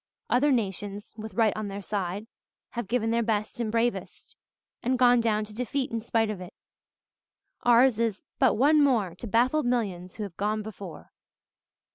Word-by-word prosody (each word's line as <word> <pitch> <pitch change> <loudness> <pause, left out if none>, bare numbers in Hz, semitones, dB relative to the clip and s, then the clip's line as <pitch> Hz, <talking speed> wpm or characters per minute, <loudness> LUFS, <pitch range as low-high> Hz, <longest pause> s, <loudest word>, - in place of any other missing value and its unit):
Other 280 +4 +4
nations, 205 -3 -2
with 215 -3 -8
right 220 -2 +3
on 215 -1 -3
their 200 0 -6
side, 200 +1 -3 0.5
have 235 -4 -4
given 225 +1 0
their 235 +1 +2
best 215 0 -1
and 225 -3 -1
bravest 235 +1 -2 0.5
and 255 +2 +1
gone 245 -1 +5
down 215 -2 +1
to 210 - -13
defeat 250 +4 -2
in 230 -1 -2
spite 225 -1 +1
of 195 -3 -6
it. 180 - -10 1.1
Ours 240 -1 +5
is 225 -4 -1 0.2
'but - - +4
one 295 +5 +5
more 225 -11 +2
To 180 +7 -8
baffled 250 +6 +2
millions 190 -7 -2
who 215 - -4
have 195 -4 -7
gone 210 +1 -1
before.'" 200 -5 -9
220 Hz, 170 wpm, -27 LUFS, 205-240 Hz, 1.1 s, gone